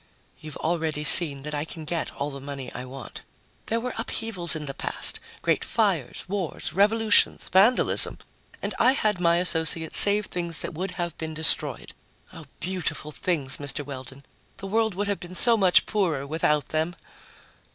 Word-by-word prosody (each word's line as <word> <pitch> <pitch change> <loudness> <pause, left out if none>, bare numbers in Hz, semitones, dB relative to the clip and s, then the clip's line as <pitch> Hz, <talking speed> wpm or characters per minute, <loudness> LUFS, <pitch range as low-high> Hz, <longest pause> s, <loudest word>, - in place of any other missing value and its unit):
"You've 155 -1 -10
already 160 -2 -3
seen 145 -2 +8
that 150 +1 -7
I 145 0 -2
can 160 0 -8
get 165 +1 -3
all 145 +1 -4
the 140 - -9
money 140 -2 -8
I 125 - -7
want. 130 -2 -10 0.5
There 230 - -1
were 250 +1 -5
upheavals 215 -7 +1
in 155 -1 -6
the 135 - -6
past - - +1 0.2
great - - 0
fires, - - -2
wars, 190 -4 -5
revolutions, 210 +2 +2
vandalism 205 +7 +4 0.5
and - - -3
I 255 - +4
had 210 -8 -1
my 170 -1 +2
associates 160 -2 +3
save 205 0 +5
things 170 -3 -1
that - - -6
would 185 +5 -4
have 175 -2 -4
been 160 -1 -6
destroyed. 160 0 -2 0.4
Oh, - - -11
beautiful 180 -4 -2
things, 150 -5 -1
Mr. 145 0 -5
Weldon! 135 0 -10 0.3
The 195 - -9
world 220 0 -1
would 205 +2 -3
have 200 -1 -2
been 180 +1 -9
so 235 +4 +3
much 190 -4 +3
poorer 170 -10 -2
without 150 0 -1
them!" 160 +3 -2
170 Hz, 170 wpm, -24 LUFS, 150-195 Hz, 0.5 s, seen